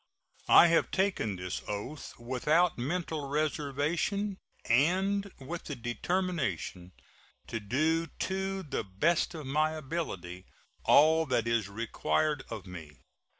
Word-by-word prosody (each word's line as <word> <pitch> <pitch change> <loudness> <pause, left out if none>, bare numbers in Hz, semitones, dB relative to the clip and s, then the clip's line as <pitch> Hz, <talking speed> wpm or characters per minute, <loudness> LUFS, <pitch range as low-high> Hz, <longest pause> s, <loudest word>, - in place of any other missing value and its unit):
I - - +9
have 170 -1 +3
taken 190 - 0
this 90 0 -4
oath 105 +9 -5
without 150 +8 +2
mental 155 +2 -3
reservation 155 +7 -1 0.3
and 190 +10 +2
with 165 +6 -6
the 145 - -4
determination 130 - -2 0.5
to 115 - -4
do 155 +10 +1
to 190 +3 -3
the 140 -6 -3
best 155 - +1
of 155 -3 -6
my 155 +3 +1
ability 115 - -5 0.4
all 160 +2 +6
that 120 -3 +1
is 115 -4 +1
required 125 +7 0
of 110 -5 -6
me. 80 -5 -10
150 Hz, 115 wpm, -30 LUFS, 115-170 Hz, 0.5 s, I